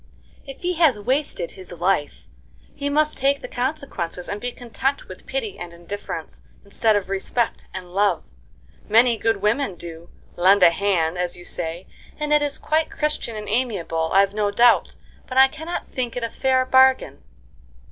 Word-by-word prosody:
"If 270 - -10
he 360 +1 0
has 285 -9 +5
wasted 260 - -1
his 185 -2 -12
life 175 -3 -1 0.5
he 285 0 -3
must 305 +1 +1
take 275 +1 +1
the - - -4
consequences, 245 - -3
and 205 +1 -4
be 245 - -2
content 255 +4 -3
with - - -12
pity 470 -5 -4
and 175 -1 -7
indifference, 170 -1 -7 0.2
instead 215 +2 +1
of 200 -2 -1
respect 195 +5 -1
and 180 -1 -8
love. 205 +1 +2 0.7
Many 230 +2 +5
good 225 -2 -1
women 210 -1 +1
do 170 0 -10 0.3
'lend 185 +2 +5
a 170 - +8
hand,' 180 -3 0
as 180 -1 -2
you 175 - -12
say, 170 +1 -4 0.3
and 300 0 -1
it 300 - +5
is 290 -1 0
quite 315 +1 0
Christian 300 -6 -2
and 210 -1 -6
amiable, 195 -9 -1
I've 195 +1 +4
no 210 -1 0
doubt; 235 +3 +4 0.3
but 255 - -5
I 265 0 +8
cannot 320 +5 -6
think 245 -3 -3
it 245 - -3
a 230 - -3
fair 260 -1 +1
bargain." 260 - +4
220 Hz, 170 wpm, -22 LUFS, 185-265 Hz, 0.7 s, a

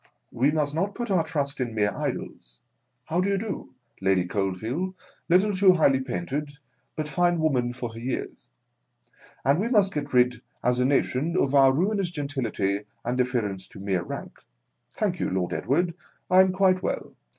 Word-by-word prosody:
We 130 +4 +2
must 150 -1 0
not 195 +6 -1
put 240 -3 -3
our 180 -4 +3
trust 145 -4 -2
in 120 -3 -3
mere 105 -1 +2
idols - - -5 0.5
(how 170 +3 0
do 195 - 0
you 200 - +2
do! 200 - -5
— - - -34
Lady 95 -2 +2
Coldveal 110 - -2 0.2
— - - -35
little 190 +4 +4
too 190 -1 +6
highly 140 -6 +4
painted, 135 +5 -3 0.4
but 155 -1 -3
fine 175 +3 +2
woman 130 -6 +1
for 120 -2 -5
her 115 - -8
years), 125 - -5 1.0
and 140 +4 +4
we 215 - 0
must 205 -5 +3
get 145 -1 -3
rid 125 -1 +3 0.2
as 125 +1 +2
a 125 - +3
nation 140 +4 +1
of 140 - +1
our 135 -1 +7
ruinous 190 +6 +1
gentility 130 - -2 0.2
and 120 +1 0
deference 110 -7 -1
to - - -13
mere 95 -2 -1
rank. - - -7 0.5
(Thank - - -1
you, - - 0
Lord 90 -1 -1
Edward, 170 +5 0 0.4
I 185 +1 +8
am 190 0 +3
quite 185 -1 +3
well. - - -3
140 Hz, 180 wpm, -26 LUFS, 120-180 Hz, 1.0 s, I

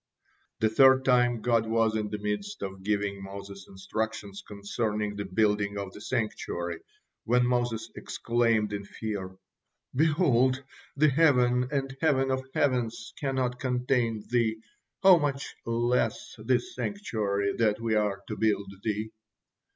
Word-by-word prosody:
The 110 - +4
third 130 +3 +6
time, 120 -3 +3
God 115 -2 +2
was 115 -1 +2
in 105 -1 -1
the 105 - -3
midst 105 - -4
of 95 -1 -6
giving 100 0 -1
Moses 100 0 -9
instructions 100 +1 -4
concerning 105 0 -2
the 100 0 -4
building 105 +1 +1
of 100 -1 -5
the - - -11
sanctuary, 85 -8 -3 0.5
when 125 +1 +3
Moses 120 -2 -1
exclaimed 115 -3 0
in 100 0 -3
fear: 100 -2 -5 0.6
"Behold, 135 -3 +3 0.3
the 155 +2 +5
heaven 125 -4 +3
and 135 -2 -2
heaven 135 -4 +2
of 130 0 -1
heavens 120 -5 0
cannot 130 -3 -1
contain 125 -4 0
Thee, 115 -2 +1 0.5
how 190 -3 +8
much 140 -2 -2
less 120 +2 0
this 370 0 0
sanctuary 105 - -1
that 110 -2 +2
we 115 -1 -1
are 105 -2 0
to 110 - -4
build 100 -2 0
Thee?" 110 +1 -2
115 Hz, 135 wpm, -28 LUFS, 105-130 Hz, 0.6 s, how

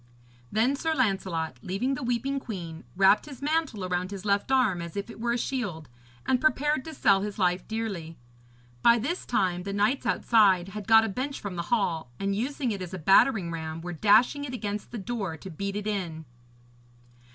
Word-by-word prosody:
Then 235 +6 +2
Sir 320 +3 -1
Lancelot, 190 - -1
leaving 205 +9 -1
the 290 - -4
weeping 250 +3 -1
queen, 175 -10 -7
wrapped 195 +7 +5
his 280 -4 -9
mantle 290 - -1
round 180 0 -1
his 200 0 -7
left 200 +5 +1
arm 235 -10 +3
as 170 +2 -7
if 200 +3 -4
it - - -12
were 235 +1 0
a - - 0
shield, 205 - -3 0.4
and 255 -1 +2
prepared 295 -2 +2
to 320 -1 -7
sell 195 -6 +4
his 205 0 -4
life 180 -2 +1
dearly. 200 -8 -4 0.6
By 235 0 +6
this 290 +11 -3
time 180 -6 +1
the 200 +2 -5
knights 210 +7 +1
outside 195 -6 +3
had 210 0 -7
got 225 0 +7
a - - -1
bench 260 +7 -3
from 200 -3 -6
the 170 - -2
hall, 170 - 0
and 195 0 -1
using 255 +3 -1
it 200 -2 -4
as 185 0 -5
a - - -4
battering 195 - +4
ram, 160 -1 -5
were 175 +1 -5
dashing 215 - +4
it 255 -3 -4
against 210 -3 -4
the 240 - -6
door 200 -5 -4
to 190 +4 -9
beat 200 +5 -4
it 210 0 -3
in. 175 -7 -3
205 Hz, 195 wpm, -27 LUFS, 185-245 Hz, 0.6 s, got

